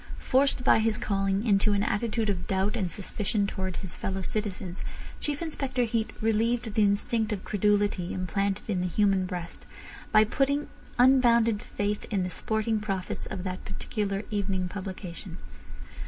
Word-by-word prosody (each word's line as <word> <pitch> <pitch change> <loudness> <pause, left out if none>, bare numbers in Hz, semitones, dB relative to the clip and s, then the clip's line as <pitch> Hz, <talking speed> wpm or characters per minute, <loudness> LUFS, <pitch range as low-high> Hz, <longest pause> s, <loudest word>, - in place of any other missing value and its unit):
Forced 265 -1 +2
by 250 - +6
his 220 -1 +2
calling 195 +1 0
into 205 -1 +4
an 200 0 +2
attitude 220 0 0
of 180 -3 -4
doubt 190 +2 +1
and 185 -3 -1
suspicion 200 +3 -1
towards 190 -2 -3
his 185 -4 -5
fellow 190 0 -3
citizens, 190 -3 -3 0.4
Chief 295 +2 -2
Inspector 270 -6 -1
Heat 225 -1 0
relieved 225 +1 +1
the 215 - +2
instinct 210 +2 +2
of 200 -3 -3
credulity 205 -3 +1
implanted 195 +2 -1
in 190 -5 0
the 180 - 0
human 195 0 +2
breast 175 -2 -6 0.4
by 215 - +7
putting 280 +6 0 0.3
unbounded 235 -4 +5
faith 205 0 -2
in 200 -4 +1
the 180 - -3
sporting 220 +4 0
prophets 195 -3 -3
of 180 - -5
that 185 -1 -4
particular 200 0 -3
evening 195 -3 0
publication. 185 -2 -7
205 Hz, 155 wpm, -28 LUFS, 190-225 Hz, 0.4 s, by